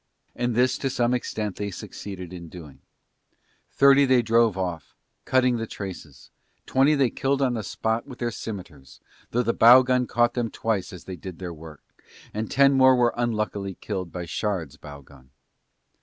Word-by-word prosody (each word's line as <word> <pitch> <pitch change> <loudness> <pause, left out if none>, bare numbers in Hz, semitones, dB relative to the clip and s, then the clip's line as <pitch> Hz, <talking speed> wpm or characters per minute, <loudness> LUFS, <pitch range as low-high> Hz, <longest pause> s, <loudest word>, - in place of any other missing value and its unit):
And 120 -1 -1
this 125 +2 +2
to 135 - -1
some 120 -1 0
extent 110 -5 -3
they 100 0 -3
succeeded 95 -1 -8
in 85 -2 -9
doing. 80 -6 -12 0.9
Thirty 140 0 +5
they 130 -2 +3
drove 115 -2 +3
off, 90 -5 -4 0.3
cutting 125 -2 +2
the 115 0 -4
traces, 90 - -9 0.3
twenty 135 +3 +3
they 135 -4 +2
killed 135 0 -1
on 130 -3 +1
the 115 - -2
spot 110 +3 -2
with 130 -3 -10
their 120 -1 -2
scimitars 90 - -9 0.3
though 125 +1 0
the 115 0 0
bow 125 +3 +8
gun 125 -1 +1
caught 120 0 +2
them 120 -2 -2
twice 110 -5 -2
as 90 -3 -10
they 95 -1 -8
did 90 -2 -9
their 90 -2 -6
work, 80 -1 -12 0.5
and 110 +1 -3
ten 140 0 +4
more 130 -1 +6
were 120 -1 +2
unluckily 105 -5 -2
killed 95 -5 -5
by 90 -1 -5
Shard's 90 -4 -3
bow 70 -1 -11
gun. 65 -2 -19
110 Hz, 175 wpm, -25 LUFS, 90-125 Hz, 0.9 s, bow